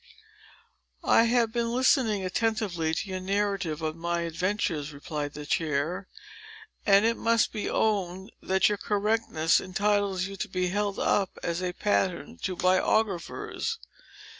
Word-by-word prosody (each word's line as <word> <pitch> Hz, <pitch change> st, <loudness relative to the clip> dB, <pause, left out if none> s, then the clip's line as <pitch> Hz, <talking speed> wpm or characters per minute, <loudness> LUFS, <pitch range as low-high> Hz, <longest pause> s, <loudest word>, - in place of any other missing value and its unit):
"I 230 Hz, -, +5 dB
have 235 Hz, -1 st, +2 dB
been 235 Hz, 0 st, -1 dB
listening 240 Hz, -5 st, +2 dB
attentively 190 Hz, -5 st, 0 dB
to 165 Hz, +6 st, -2 dB
your 185 Hz, -1 st, -3 dB
narrative 195 Hz, -4 st, -1 dB
of 155 Hz, 0 st, -2 dB
my 170 Hz, +1 st, -2 dB
adventures," 170 Hz, -3 st, -1 dB
replied 145 Hz, 0 st, -5 dB
the 150 Hz, 0 st, -7 dB
chair, 160 Hz, +5 st, -1 dB, 0.8 s
"and 200 Hz, +1 st, +6 dB
it 230 Hz, +1 st, +2 dB
must 230 Hz, 0 st, +2 dB
be 210 Hz, -, -2 dB
owned, 190 Hz, -2 st, 0 dB
that 190 Hz, 0 st, +3 dB
your 205 Hz, -1 st, -1 dB
correctness 205 Hz, -6 st, +1 dB
entitles 200 Hz, 0 st, 0 dB
you 195 Hz, 0 st, -7 dB
to -, -, -3 dB
be 185 Hz, -1 st, -1 dB
held 205 Hz, +1 st, -1 dB
up 195 Hz, -3 st, +1 dB
as 170 Hz, +1 st, -1 dB
a 180 Hz, -1 st, -2 dB
pattern 205 Hz, +3 st, -1 dB
to 185 Hz, -, -2 dB
biographers. 190 Hz, -, 0 dB
190 Hz, 140 wpm, -28 LUFS, 170-210 Hz, 0.8 s, and